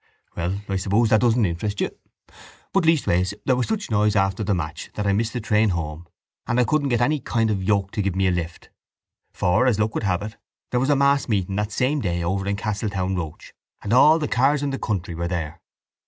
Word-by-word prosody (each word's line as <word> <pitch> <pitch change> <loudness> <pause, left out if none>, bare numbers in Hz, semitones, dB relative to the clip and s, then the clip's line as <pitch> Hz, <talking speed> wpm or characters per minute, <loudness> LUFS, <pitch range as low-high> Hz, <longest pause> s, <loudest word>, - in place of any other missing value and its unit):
—Well, 90 +4 -2
I 95 - -1
suppose 100 +4 +2
that 110 - +5
doesn't 120 -2 +3
interest 100 +4 -3
you, - - 0 0.8
but 195 -3 +2
leastways 100 - +2
there 130 - +3
was 125 - -1
such 220 - -3
noise 105 0 +2
after 95 +1 +1
the 100 -1 +1
match 80 -1 -5
that 105 - -2
I 100 - +2
missed 110 +3 -1
the 125 - -2
train 105 0 +2
home 80 -1 -4 0.4
and 120 +1 +1
I - - +5
couldn't 145 +1 +1
get 120 -1 +1
any 150 +5 +2
kind 115 -3 0
of 100 - 0
a - - -5
yoke 100 0 +1
to 105 - -2
give 100 -2 -1
me 95 0 +1
a 95 - +3
lift 85 -1 -5 0.6
for, 95 +8 +2
as 110 -5 +2
luck 110 +1 0
would - - -2
have 100 -2 0
it, 110 +1 -7 0.3
there 125 - +1
was 135 +3 0
a 145 - +4
mass 140 0 +2
meeting 95 -3 0
that 105 +1 -1
same 140 +3 0
day 85 -3 -1
over 95 +3 -1
in 100 - 0
Castletownroche 95 -5 -3 0.3
and 105 - -1
all 150 +6 +7
the 150 -2 -2
cars 140 +4 +2
in 140 - -1
the 135 - -4
country 95 -5 -3
were 85 +1 -3
there. 85 -2 -4
105 Hz, 230 wpm, -23 LUFS, 95-125 Hz, 0.8 s, all